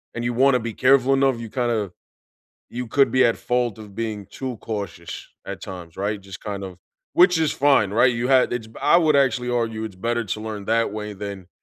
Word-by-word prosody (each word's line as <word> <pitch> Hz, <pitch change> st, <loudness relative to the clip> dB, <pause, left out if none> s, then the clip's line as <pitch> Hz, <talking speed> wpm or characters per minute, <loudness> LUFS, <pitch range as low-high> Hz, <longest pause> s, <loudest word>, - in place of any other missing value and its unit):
and 115 Hz, -, -3 dB
you 120 Hz, -, 0 dB
wanna 130 Hz, +1 st, +4 dB
be 115 Hz, -1 st, -5 dB
careful 135 Hz, +2 st, +4 dB
enough, 135 Hz, -3 st, +2 dB
you 115 Hz, -2 st, -7 dB
kinda 115 Hz, -7 st, -1 dB, 0.8 s
you 125 Hz, 0 st, -5 dB
could 135 Hz, +2 st, +3 dB
be 130 Hz, +1 st, +4 dB
at 115 Hz, -1 st, +3 dB
fault 120 Hz, -3 st, -1 dB
of 105 Hz, -2 st, -11 dB
being 110 Hz, -2 st, -4 dB
too 125 Hz, +5 st, -6 dB
cautious 100 Hz, -6 st, -6 dB, 0.2 s
at -, -, -6 dB
times, 85 Hz, -3 st, -9 dB
right, 100 Hz, +1 st, -2 dB
just 95 Hz, -1 st, -10 dB
kind 100 Hz, -2 st, -5 dB
of 90 Hz, -2 st, -9 dB, 0.4 s
which 180 Hz, -1 st, +5 dB
is 160 Hz, -2 st, +1 dB
fine, 135 Hz, -8 st, +3 dB
right, 120 Hz, +2 st, +4 dB
you 120 Hz, +2 st, -1 dB
had 130 Hz, -2 st, +4 dB
it's 115 Hz, -2 st, -3 dB
b 110 Hz, -, -18 dB
I 170 Hz, -, +5 dB
would 155 Hz, -4 st, +3 dB
actually 125 Hz, -2 st, +2 dB
argue 115 Hz, -2 st, -1 dB
it's 100 Hz, -4 st, -7 dB
better 120 Hz, +3 st, -1 dB
to 105 Hz, +1 st, -4 dB
learn 110 Hz, -2 st, -6 dB
that 115 Hz, -1 st, +1 dB
way 105 Hz, 0 st, -5 dB
than 100 Hz, -2 st, -7 dB
115 Hz, 215 wpm, -23 LUFS, 105-125 Hz, 0.8 s, which